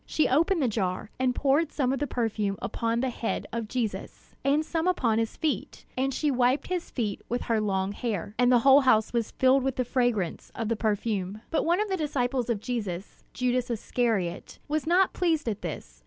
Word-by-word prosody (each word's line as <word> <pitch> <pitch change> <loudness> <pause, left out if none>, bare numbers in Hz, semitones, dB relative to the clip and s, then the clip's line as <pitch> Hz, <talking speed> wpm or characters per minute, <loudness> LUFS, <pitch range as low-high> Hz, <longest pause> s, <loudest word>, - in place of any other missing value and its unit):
She 310 - +2
opened 330 +4 +2
the - - +3
jar, 200 -2 -2
and 255 -1 +1
poured 290 +3 +2
some 265 -3 0
of 270 - -2
the 290 - -1
perfume 215 -5 -1
upon 230 0 -1
the 260 -1 0
head 230 - -3
of 230 -2 -3
Jesus, 230 -2 -4
and 290 +3 +2
some 330 +2 -1
upon 235 -11 +2
his 225 -1 -2
feet; 310 -2 -2
and 265 +1 0
she 295 +2 0
wiped 255 +2 +2
his 360 -2 -2
feet 215 -6 -3
with 245 +1 -1
her 225 -2 +1
long 195 -2 0
hair. 205 -3 -3
And 245 0 +5
the 250 - +7
whole 275 +1 +8
house 220 -5 +3
was 230 -2 0
filled 260 +1 +3
with 265 0 -1
the 255 - 0
fragrance 240 -8 -1
of 225 -2 -2
the 230 - +1
perfume. 210 -2 -1
But 325 - +1
one 345 +3 +2
of 425 - +1
the 380 -1 -1
disciples 260 -5 -1
of 230 -3 0
Jesus, 205 -5 -5
Judas 250 0 0
Iscariot, 225 -5 -1
was 305 +1 -1
not 365 +3 +4
pleased 325 -6 0
at 210 -3 -2
this. - - -7
245 Hz, 205 wpm, -27 LUFS, 215-275 Hz, -, whole